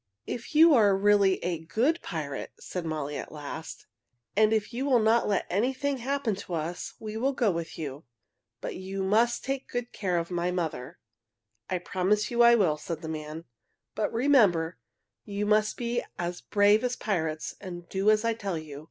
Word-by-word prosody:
"If 245 +6 -6
you 320 +1 +8
are 205 -6 +5
really 200 -1 +4
a 175 -2 -1
good 250 - +1
pirate," 150 -6 -5
said 180 -3 -5
Molly 150 -2 -3
at - - -7
last, 155 +1 -7 0.5
"and 215 +1 +4
if 220 +1 0
you 250 +3 -2
will 270 -3 +4
not 225 +1 +3
let 200 -2 +1
anything 260 +8 0
happen 260 -2 -1
to 180 -3 -5
us, 165 +2 -4
we 215 0 -6
will 270 +4 +1
go 235 -6 +2
with 170 -1 -5
you. 145 -1 -6 0.6
But - - -4
you 190 +1 -4
must 225 +5 +2
take 270 0 -3
good 245 0 -3
care 185 -4 -1
of 170 +1 -2
my 175 0 0
mother." 165 -4 -3 0.7
"I 185 - 0
promise 190 +5 0
you 240 0 +2
I 235 0 +8
will," 175 -9 +2
said 165 +1 -6
the - - -4
man. 155 +1 -6 0.5
"But 215 - -1
remember, 215 - +3 0.4
you 205 0 -3
must 215 0 +2
be 240 0 -1
as 175 0 -3
brave 205 +1 +4
as 250 0 0
pirates 160 -7 -2
and 175 -2 -8
do 195 +2 +1
as 215 +1 +3
I 230 - +2
tell 200 -6 -3
you. 150 -3 -8
200 Hz, 185 wpm, -28 LUFS, 170-230 Hz, 0.7 s, you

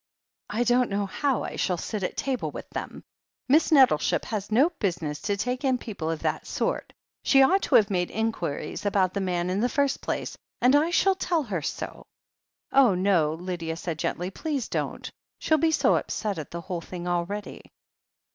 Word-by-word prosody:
"I 225 +3 0
don't 245 +1 +3
know 200 0 -1
how 265 +5 -1
I - - -5
shall 180 -2 0
sit 210 +4 -4
at 180 - -3
table 265 -3 -1
with - - -8
them. - - -6 0.4
Miss 305 +6 +4
Nettleship 260 - +4
has 210 -2 -4
no 275 +10 +4
business 160 -6 -2
to 200 0 -1
take 250 +6 -2
in 260 -2 +2
people 195 -9 -5
of 165 -1 -3
that - - -1
sort - - -2 0.2
— - - -68
^she 270 -1 +6
ought 385 +5 +3
to - - +1
have 205 -1 +5
made 180 -2 0
inquiries 210 -5 -3
about 195 -3 +2
the 200 - -1
man 180 -1 -1
in 190 - 0
the 245 +3 +2
first 280 0 0
place, - - -3 0.2
and 255 +3 +5
I 305 +3 +4
shall 385 +3 +3
tell 350 -4 0
her 195 - -3
so." - - -5 0.6
"Oh, 260 -8 +5
no," 180 -5 +2
said 170 - -11
Lydia 165 -3 -3 0.2
gently. 175 +4 -3
"Please 280 +1 -3
don't. - - -3 0.3
She'll 315 -1 +2
be 325 - +3
so 320 - +3
upset 205 -6 -2
at 150 - -7
the 170 - -6
whole 175 -1 -4
thing 175 +1 -7
already." 175 +4 -3
205 Hz, 195 wpm, -26 LUFS, 180-265 Hz, 0.6 s, ^she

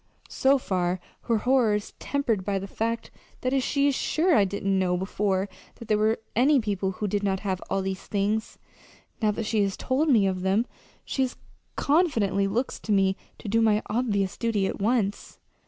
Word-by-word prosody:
So 270 +1 +3
far 185 -6 -1 0.3
her 230 - +2
horror 245 -2 +3
is 210 - -4
tempered 235 -9 -1
by 200 0 -1
the 195 - -4
fact 230 +3 -3 0.3
that 260 +1 +1
she 280 +2 +1
is 285 - +2
sure 330 +6 +1
I 205 - +5
didn't 195 0 0
know 180 -1 +1
before 190 +1 0 0.3
that 230 - -12
there 215 - +4
were 220 +1 +2 0.2
any 270 +5 +5
people 200 -4 -1
who 210 +3 -3
did 205 +1 0
not 195 -2 0
have 190 -3 -2
all 195 0 0
these 190 0 -4
things. 210 +2 -1 0.6
Now 215 - +3
that 215 +2 -2
she 215 0 +1
has 195 -1 0
told 280 +5 0
me 225 -7 +5
of 185 -1 -1
them, 195 +5 +2 0.4
she 265 -2 0 0.5
confidently 230 - +2
looks 235 +7 -2
to 220 - -4
me 195 -1 +3 0.2
to - - -9
do 225 +3 +2
my 215 -1 +3
obvious 205 -5 0
duty 225 -4 0
at 195 - -3
once." 215 -2 0
210 Hz, 190 wpm, -26 LUFS, 195-240 Hz, 0.6 s, I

